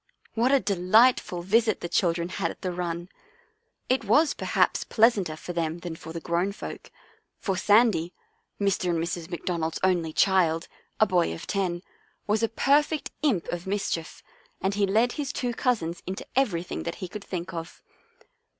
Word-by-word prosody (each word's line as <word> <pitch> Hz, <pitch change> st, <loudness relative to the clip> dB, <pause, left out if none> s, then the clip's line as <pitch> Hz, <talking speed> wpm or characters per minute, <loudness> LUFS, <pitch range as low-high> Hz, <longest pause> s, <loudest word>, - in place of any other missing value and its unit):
What 235 Hz, +3 st, +2 dB
a 275 Hz, -, +5 dB
delightful 200 Hz, -1 st, +3 dB
visit 220 Hz, +3 st, +2 dB
the -, -, -3 dB
children 170 Hz, -1 st, +1 dB
had 185 Hz, -3 st, -2 dB
at -, -, -10 dB
the 185 Hz, -, -1 dB
run! 175 Hz, -1 st, -3 dB, 0.8 s
It 255 Hz, -1 st, +1 dB
was 290 Hz, +9 st, +4 dB
perhaps -, -, +1 dB
pleasanter 210 Hz, -8 st, +3 dB
for 175 Hz, +3 st, -7 dB
them 165 Hz, -1 st, -1 dB
than 170 Hz, -2 st, -5 dB
for 160 Hz, 0 st, -9 dB
the 165 Hz, -, -5 dB
grown 175 Hz, +4 st, -1 dB
folk, -, -, -8 dB, 0.5 s
for 195 Hz, -, -2 dB
Sandy, 205 Hz, -4 st, +3 dB, 0.5 s
Mr. 195 Hz, -2 st, +1 dB
and 170 Hz, -, +1 dB
Mrs. 170 Hz, 0 st, -3 dB
McDonald's 170 Hz, -2 st, -2 dB
only 175 Hz, -4 st, +2 dB
child, 170 Hz, -2 st, +2 dB, 0.3 s
a 215 Hz, -, +6 dB
boy 180 Hz, -, +2 dB
of -, -, -9 dB
ten, 180 Hz, -3 st, -1 dB, 0.4 s
was 210 Hz, +1 st, +1 dB
a 225 Hz, -, +2 dB
perfect 290 Hz, +5 st, +2 dB
imp 245 Hz, -, +1 dB
of 175 Hz, +1 st, -4 dB
mis 200 Hz, +1 st, -1 dB
chief, 165 Hz, -1 st, -4 dB, 0.4 s
and 190 Hz, +2 st, 0 dB
he 200 Hz, 0 st, +1 dB
led 225 Hz, +5 st, +3 dB
his 290 Hz, -1 st, -3 dB
two 245 Hz, -4 st, -2 dB
cousins 175 Hz, -10 st, -1 dB
into 190 Hz, +1 st, -5 dB
everything 180 Hz, -, 0 dB
that -, -, -4 dB
he 185 Hz, -, -6 dB
could 205 Hz, +3 st, -8 dB
think 180 Hz, -1 st, -5 dB
of. 165 Hz, -1 st, -7 dB
185 Hz, 170 wpm, -26 LUFS, 170-220 Hz, 0.8 s, a